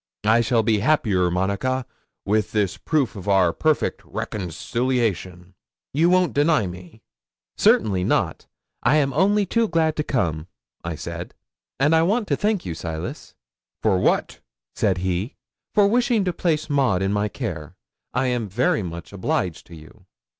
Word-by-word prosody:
I 110 +2 +5
shall 115 0 +2
be 110 -1 +2
happier, 100 -8 +2
Monica, 100 +9 -1 0.4
with 105 +1 0
this 100 -3 +1
proof 150 -8 -1
of 100 -1 -8
our 95 -4 +4
perfect 155 -1 0
reconciliation. 95 -2 -3 0.4
You 165 +5 +3
won't 180 -2 +3
deny 145 -5 +3
me?" 90 +4 -10 0.5
'"Certainly 95 -4 +3
not. - - 0 0.3
I 150 - +3
am 140 -3 +2
only 200 +6 +3
too 230 +4 +1
glad 160 -4 +1
to 150 - 0
come," 85 - -1 0.5
said - - -7 0.4
I; 135 - +3
"and 155 +2 +4
I 160 - +5
want 205 +6 +1
to - - +3
thank 210 -2 0
you, 85 - -3
Silas." 80 -1 -6 0.5
'"For 100 -4 +3
what?" - - +1 0.4
said 95 -3 +1
he. 95 - -2 0.4
'"For 205 - +6
wishing 235 -1 +2
to 180 - 0
place 155 -3 0
Maud 130 - +1
in 95 +1 0
my 105 +1 +1
care. 75 -5 -6 0.4
I 125 +2 0
am 120 -4 -1
very 110 +2 +1
much 85 0 -7
obliged 90 -3 -2
to 85 - -11
you." 80 0 -16
110 Hz, 155 wpm, -23 LUFS, 95-155 Hz, 0.5 s, For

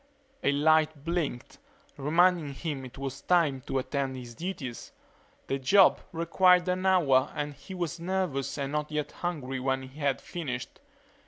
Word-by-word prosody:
A - - +3
light 155 0 +3
blinked, 165 -8 -3 0.4
reminding 160 0 +2
him 145 -3 -4
it 130 0 -10
was 135 0 -5
time 160 -7 +2
to - - -1
attend 135 0 -2
to - - -6
his 120 -1 -10
duties. 150 -6 -6 0.5
The 135 - -2
job 190 +9 +5
required 180 +2 +4
an 185 +1 0
hour 145 -8 +4
and 145 0 -3
he 145 +7 -10
was 175 -1 -3
nervous 175 -7 -2
and 140 -1 -3
not 150 0 -2
yet 150 -1 -2
hungry 140 -7 -4
when 130 0 -1
he 130 +3 -12
had 140 -2 +1
finished. 135 -8 -6
150 Hz, 160 wpm, -29 LUFS, 135-175 Hz, 0.5 s, job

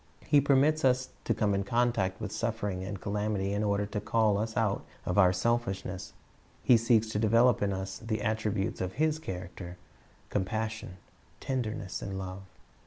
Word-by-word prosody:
He 145 - +5
permits 145 +3 +3
us 130 -1 +3 0.2
to - - +2
come 105 -2 +1
in 100 0 +1
contact 110 -4 +1
with 105 -2 -4
suffering 105 -5 -2
and 100 0 -5
calamity 105 -1 -1
in 105 +1 0
order 100 0 +1
to 105 0 -4
call 105 -1 +2
us 110 0 -3
out 105 -2 +1 0.2
of 90 +3 +1
our 90 -2 +7
selfishness; 95 -2 -1 0.5
He 125 - +6
seeks 115 -1 +3
to 105 - -1
develop 115 +2 +4
in 100 -1 +1
us 95 0 -4
the 110 -2 -3
attributes 110 0 -1
of 95 0 -2
His 155 +4 +1
character, 90 - -7 0.3
— - - -31
compassion, 110 0 -2 0.4
tenderness, 110 -7 -3
and 95 -1 -4
love. 95 0 -5
105 Hz, 170 wpm, -30 LUFS, 95-115 Hz, 0.5 s, our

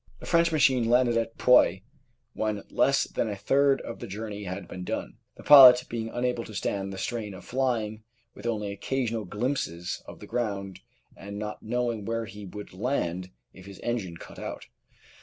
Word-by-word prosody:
The - - -10
French 170 0 +3
machine 130 -6 +3
landed 120 -1 +4
at 115 0 -1
Poix 95 -6 +5 0.5
when 105 -2 -2
less 140 0 +3
than 115 - -2
a 105 - -3
third 135 +6 +2
of 115 - -7
the - - -7
journey 105 0 -6
had 95 0 -5
been 90 - -7
done, - - -4 0.2
the - - -12
pilot 130 -3 +10
being 115 -1 -3
unable 120 0 -1
to 110 - -10
stand 100 0 -2
the 95 - -7
strain 105 -1 -4
of 90 - -12
flying 115 -4 -1 0.3
with - - -7
only 105 -3 -2
occasional 115 +1 -2
glimpses 90 - -3
of - - -10
the - - -10
ground 100 -5 -3 0.4
and 100 +1 -8
not 105 0 -5
knowing 120 -1 -2
where 115 +2 -2
he 105 -1 -10
would 105 +1 -9
land 95 -5 -2 0.2
if 95 0 -14
his 100 -1 -10
engine 105 -8 -3
cut - - -12
out. - - -6
110 Hz, 180 wpm, -27 LUFS, 100-125 Hz, 0.5 s, pilot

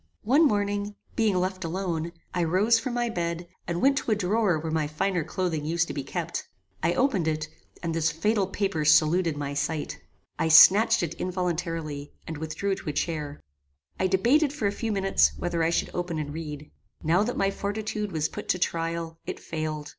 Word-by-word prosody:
One 280 +9 +5
morning, 205 -2 -1 0.2
being 220 -4 +2
left 185 +1 -1
alone, 170 -1 -2 0.2
I 175 - +1
rose 200 +8 +3
from 245 0 -4
my 240 0 +1
bed, 170 -4 -3 0.2
and 175 0 -2
went 275 +1 +4
to - - -6
a 215 - +4
drawer 205 -2 +1
where 160 +1 -4
my 155 -2 0
finer 170 +3 -1
clothing 165 -1 -2
used 165 +2 0
to - - -3
be 140 - -3
kept. 170 +4 -4 0.3
I 170 - +1
opened 225 - +2
it, 155 -1 -1 0.4
and 165 -1 -1
this 165 0 +1
fatal 195 +5 +1
paper 195 -5 -1
saluted 155 +2 +4
my 145 -1 -3
sight. 145 +2 -2 0.4
I - - +2
snatched 200 +7 +7
it 165 -1 -2
involuntarily, 165 -5 -3
and 160 -2 -6
withdrew 160 +6 -2
to 190 - -5
a - - -2
chair. 150 -2 -3 0.6
I 190 - +3
debated, 245 - +3
for 290 -7 -4
a 200 - +3
few 225 +2 -3
minutes, 195 -1 +3
whether 175 -1 -1
I 165 - +3
should 170 - 0
open 175 -2 -2
and 145 -1 -4
read. 150 -2 -7 0.3
Now 170 +5 +3
that 235 +4 -1
my 195 0 +2
fortitude 210 +1 -3
was 160 -2 0
put - - -8
to - - +3
trial, 165 -1 -2
it - - -4
failed. 155 -2 -4
175 Hz, 190 wpm, -27 LUFS, 160-200 Hz, 0.6 s, snatched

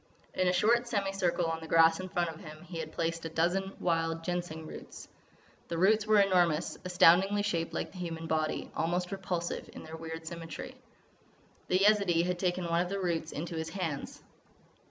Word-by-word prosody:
In 185 - +1
a - - +4
short 235 +6 +3
semi 200 -4 0
circle 180 -3 0
on 165 0 -1
the 160 - -9
grass 165 +1 +5
in 185 0 -5
front 175 -2 0
of 160 - -12
him 155 -2 -10
he 170 -1 -7
had 155 -1 -5
placed 165 0 -2
a 165 - -4
dozen 180 +4 0
wild 165 -1 0
Ginseng 175 -2 -3
roots. - - -10 0.6
The 170 - -3
roots 210 +4 +3
were 215 -1 +5
enormous, 175 -5 +3
astoundingly 180 +3 +5
shaped 170 -5 -1
like - - -3
the 185 - -11
human 165 -2 -4
body, 155 -1 -1
almost 175 +3 -1
repulsive 180 -3 -3
in - - -9
their 160 - -8
weird 160 0 -7
symmetry. 170 +10 -7 0.9
The 180 - +3
Yezidee 195 -4 +4
had 180 0 -1
taken 180 -1 0
one 170 0 +2
of 180 - -2
these 200 - -2
roots 170 -4 -1
into 165 +4 -5
his 160 0 -3
hands. 165 -6 -4
175 Hz, 190 wpm, -31 LUFS, 165-185 Hz, 0.9 s, grass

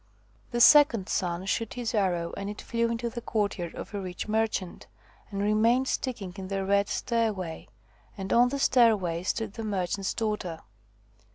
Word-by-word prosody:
The 240 - -2
second 260 -9 +6
son 180 0 -1
shot 200 0 -2
his 240 -2 -3
arrow, 180 -5 0
and 200 0 -4
it 205 - -7
flew 230 0 -1
into 235 +1 -2
the 235 0 -5
courtyard 200 -7 -2
of - - -8
a 200 - -3
rich 180 +1 -5
merchant, 215 -4 -2 0.4
and 200 -1 -3
remained 225 +5 +3
sticking 215 -11 -3
in 190 -1 -6
the 195 0 -2
red 200 +1 +2
stairway, 210 -8 -2 0.5
and 195 -1 -3
on 245 +1 +5
the 280 - -2
stairway 215 -11 +3
stood 210 +3 -2
the 225 - -6
merchant's 195 -2 -2
daughter. 210 -7 -3
205 Hz, 165 wpm, -28 LUFS, 190-230 Hz, 0.5 s, second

